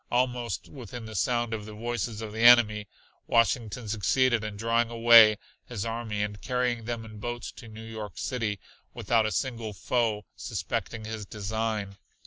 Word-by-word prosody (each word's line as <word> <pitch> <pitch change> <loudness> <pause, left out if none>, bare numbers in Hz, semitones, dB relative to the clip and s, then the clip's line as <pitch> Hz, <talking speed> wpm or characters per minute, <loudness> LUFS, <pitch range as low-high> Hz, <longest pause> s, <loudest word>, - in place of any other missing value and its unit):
Almost 120 -2 -1
within 120 -3 -9
the 110 - -8
sound 120 +4 0
of 105 -1 -5
the 105 - -9
voices 115 -1 -3
of 105 -1 -6
the 110 - -6
enemy 110 -3 +6 0.4
Washington 115 0 +1
succeeded 115 +3 +2
in 105 -1 -5
drawing 115 +2 +1
away 115 -2 +7 0.3
his 115 -4 -4
army 115 -2 -2
and 105 -1 -5
carrying 125 -3 -1
them 115 -1 -4
in 110 -1 -11
boats 120 +2 -5
to 115 - -10
New 110 0 -10
York 110 -4 -7
City, 110 -5 -2 0.4
without 110 -2 +2
a - - -2
single 115 -5 -2
foe 110 -1 -1
suspecting 110 -1 -4
his 110 -2 -6
design. 105 -1 -3
115 Hz, 160 wpm, -28 LUFS, 105-120 Hz, 0.4 s, away